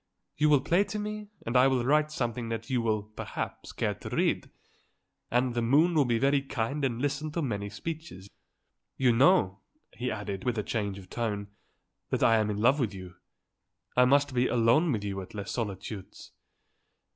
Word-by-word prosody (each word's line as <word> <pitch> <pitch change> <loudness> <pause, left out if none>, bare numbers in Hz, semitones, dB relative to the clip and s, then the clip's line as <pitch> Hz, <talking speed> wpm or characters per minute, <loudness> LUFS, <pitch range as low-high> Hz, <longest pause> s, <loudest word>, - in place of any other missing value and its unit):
You 150 +1 +3
will 145 -3 +5
play 175 +7 +3
to 215 - -5
me, 210 0 -4 0.2
and 115 - -3
I 125 +1 +7
will 130 -3 +1
write 150 +3 +3
something 120 -5 -2
that 115 +2 -4
you 125 -2 +2
will, 110 -2 0
perhaps, 105 +1 -6
care - - -1
to - - -9
read. - - 0 0.8
And 125 +1 +1
the 120 - 0
moon 145 +9 +4
will 150 -4 +4
be 120 -2 +1
very 140 +3 +3
kind 135 +1 -3
and 120 -3 0
listen 145 +3 -2
to 170 - -1
many 100 -6 -2
speeches. 155 - -7 0.7
You 130 -2 +4
know," 115 - +4 0.3
he 125 +3 -3
added, 100 -2 -4
with 120 -2 -1
a 105 - 0
change 100 -3 -2
of 95 -2 -11
tone, 105 -4 -2 0.6
"that - - 0
I 115 - +5
am 110 -1 +1
in 105 - -2
love 125 +7 +3
with 110 -6 -1
you. 95 -1 -9 0.8
I 125 - +6
must 140 +1 +3
be 125 0 +2
alone 125 +8 +3
with 105 -5 -1
you 100 -1 -3
at 95 - -11
Les 100 -2 -5
Solitudes." 100 -3 -6
120 Hz, 190 wpm, -29 LUFS, 105-140 Hz, 0.8 s, I